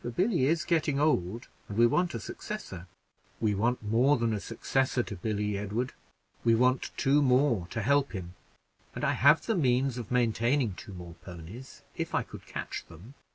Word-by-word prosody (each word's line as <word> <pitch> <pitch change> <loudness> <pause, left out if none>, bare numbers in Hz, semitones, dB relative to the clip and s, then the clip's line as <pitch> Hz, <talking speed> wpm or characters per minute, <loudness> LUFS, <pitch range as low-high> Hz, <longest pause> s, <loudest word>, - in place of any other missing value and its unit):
For 120 - -4
Billy 175 - +1
is 160 +1 +2
getting 155 -5 +1
old, 115 - +1 0.2
and 105 - -5
we 120 - +6
want 175 +9 +1
a - - -2
successor." 95 - -7 0.5
"We 110 -2 +1
want 115 +4 0
more 120 +7 +3
than 115 -2 0
a 105 - -1
successor 125 +3 0
to 105 - -6
Billy, 105 +1 -2
Edward: 110 +5 -2 0.5
we 115 -1 +5
want 125 +2 +2
two 140 +2 +3
more 125 -8 +3
to 110 +4 -4
help 140 +2 +2
him 90 -3 -6 0.6
and - - -5
I - - +3
have - - +5
the 225 - +1
means 130 - +1
of 115 - -7
maintaining 120 0 +1
two 95 - -10
more 85 -1 -9
ponies 90 +8 -10
if - - -3
I - - +2
could - - -12
catch - - -5
them." 85 - -13
120 Hz, 185 wpm, -29 LUFS, 105-135 Hz, 0.6 s, we